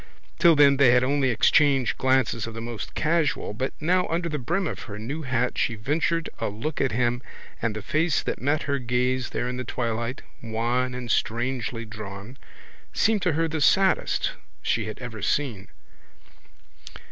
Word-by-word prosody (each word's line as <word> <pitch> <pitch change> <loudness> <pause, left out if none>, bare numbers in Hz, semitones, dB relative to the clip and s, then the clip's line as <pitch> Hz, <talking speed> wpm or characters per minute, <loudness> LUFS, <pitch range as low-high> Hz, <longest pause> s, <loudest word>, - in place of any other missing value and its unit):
Till 170 -3 +6
then 140 -2 +6
they 135 -2 +6
had 125 0 +4
only 135 0 +2
exchanged 135 +2 +3
glances 130 -4 +2
of 115 - -7
the - - -5
most 115 -1 -6
casual 160 -8 0
but 130 +5 -2
now 180 +4 +2
under 170 +1 -1
the 150 -2 -3
brim 170 +9 -1
of - - -4
her 105 - -6
new 135 +9 -5
hat 125 -3 -1
she 115 - +1
ventured 155 +8 0
a 115 - -1
look 135 +10 -4
at 135 - +1
him 120 +1 0 0.4
and 115 -2 -1
the 110 - -5
face 160 0 +1
that - - -3
met 145 +4 +1
her 140 -1 -1
gaze 125 +1 0
there 120 - -2
in 125 0 -3
the 125 - -3
twilight, 115 0 -3 0.2
wan 120 +3 -1
and 125 -2 -4
strangely 115 0 -1
drawn, 105 +1 -8 0.6
seemed 220 -2 +2
to 180 -3 +1
her 165 +2 +1
the 160 -1 -3
saddest 190 +5 +3 0.3
she 115 -2 0
had 110 - -6
ever 120 -4 -7
seen. 105 -3 -1
125 Hz, 175 wpm, -25 LUFS, 115-150 Hz, 0.6 s, Till